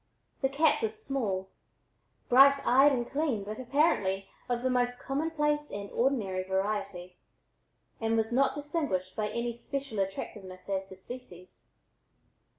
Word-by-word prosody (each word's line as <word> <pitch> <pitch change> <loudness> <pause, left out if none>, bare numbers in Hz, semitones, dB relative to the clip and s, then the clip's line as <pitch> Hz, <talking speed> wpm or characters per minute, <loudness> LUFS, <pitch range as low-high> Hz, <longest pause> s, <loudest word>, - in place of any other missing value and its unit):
The 270 - +2
cat 300 +3 +3
was 220 -1 -2
small, 200 -9 -2 0.8
bright 275 +3 +8
eyed 270 +4 +6
and 240 -3 -1
clean 280 -8 -1
but 215 +3 -6
apparently 240 - +1 0.2
of 245 0 -1
the 260 - +2
most 245 0 +1
commonplace 295 0 -1
and 200 0 -6
ordinary 230 -8 0
variety, 190 -1 -3 0.8
and 225 0 +1
not 270 +3 +3
distinguished 290 - -2
by 210 -1 -1
any 235 +1 -2
special 265 -1 -5
attractiveness 190 -1 -5
as 190 -1 -2
to 190 - -9
species. 185 -3 -11
235 Hz, 130 wpm, -30 LUFS, 195-275 Hz, 0.8 s, bright